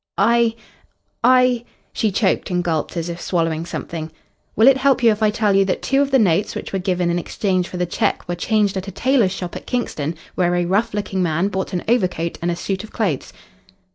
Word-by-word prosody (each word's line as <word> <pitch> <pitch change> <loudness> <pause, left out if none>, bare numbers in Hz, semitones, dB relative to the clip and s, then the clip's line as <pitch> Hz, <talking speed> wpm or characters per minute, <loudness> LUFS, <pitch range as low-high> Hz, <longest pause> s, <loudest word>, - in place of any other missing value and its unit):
"I 230 +2 +3 0.7
I 250 -1 +4 0.2
" - - -41
She 220 -3 0
choked 195 0 0
and 180 -1 0
gulped 165 0 -2
as 165 0 -2
if 170 0 -6
swallowing 165 -2 -1
something. 160 -2 -5 0.4
"Will 220 +4 +5
it 270 -1 +7
help 265 -1 +2
you 230 - +7
if 215 0 -3
I 215 - +4
tell 210 -2 +1
you 195 - +5
that 190 - -2
two 270 +1 +2
of 280 - +1
the 270 - +4
notes 200 -3 +2
which - - -6
were 195 - 0
given 180 -2 0
in 175 - 0
exchange 185 0 -1
for 180 - -7
the 180 - 0
cheque 175 - -1
were 175 - -2
changed 205 +3 +1
at 190 +1 -5
a - - -5
tailor's 240 -1 +2
shop 180 -2 -5
at - - -8
Kingston, 165 -10 -2 0.2
where 175 -1 +1
a 175 0 +1
rough 205 +5 0
looking 200 -2 -2
man 170 +3 +1
bought 190 -1 -3
an 180 -2 -2
overcoat 185 -7 0
and 170 - -1
a 170 - 0
suit 190 +3 -3
of 220 - -11
clothes?" 185 - -2
190 Hz, 230 wpm, -20 LUFS, 175-225 Hz, 0.7 s, it